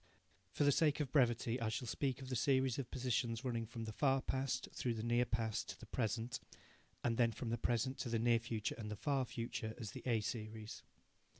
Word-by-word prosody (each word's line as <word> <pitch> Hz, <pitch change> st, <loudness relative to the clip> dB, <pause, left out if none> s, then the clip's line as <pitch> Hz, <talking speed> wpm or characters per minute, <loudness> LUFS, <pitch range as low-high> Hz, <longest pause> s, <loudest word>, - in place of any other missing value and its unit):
For -, -, 0 dB
the 145 Hz, -, +6 dB
sake 150 Hz, +1 st, +3 dB
of 140 Hz, -4 st, -1 dB
brevity 120 Hz, -3 st, +3 dB
I 115 Hz, -, +1 dB
shall 115 Hz, +2 st, -2 dB
speak 135 Hz, +2 st, -1 dB
of 130 Hz, -, -7 dB
the 130 Hz, -, -1 dB
series 130 Hz, 0 st, +3 dB
of 130 Hz, -, -3 dB
positions 120 Hz, -1 st, 0 dB
running 115 Hz, -3 st, -1 dB
from 115 Hz, 0 st, -5 dB
the 110 Hz, -, -4 dB
far 135 Hz, +2 st, +3 dB
past 130 Hz, 0 st, -1 dB
through 120 Hz, -2 st, -1 dB
the 110 Hz, -, -3 dB
near 120 Hz, +1 st, +3 dB
past 115 Hz, -2 st, -1 dB
to -, -, -6 dB
the -, -, -9 dB
present, 115 Hz, 0 st, -1 dB, 0.6 s
and 115 Hz, -1 st, +1 dB
then 115 Hz, -2 st, +4 dB
from 115 Hz, +1 st, -4 dB
the 115 Hz, -, 0 dB
present 120 Hz, +3 st, 0 dB
to 125 Hz, -, -2 dB
the 115 Hz, -, +2 dB
near 115 Hz, +1 st, +4 dB
future 115 Hz, -2 st, -2 dB
and 105 Hz, -2 st, -4 dB
the 105 Hz, -, -3 dB
far 135 Hz, +3 st, +1 dB
future, 115 Hz, -2 st, -4 dB
as 110 Hz, -5 st, -5 dB
the -, -, -7 dB
A 115 Hz, -3 st, +3 dB
series. 110 Hz, -1 st, -5 dB
120 Hz, 220 wpm, -38 LUFS, 115-130 Hz, 0.6 s, the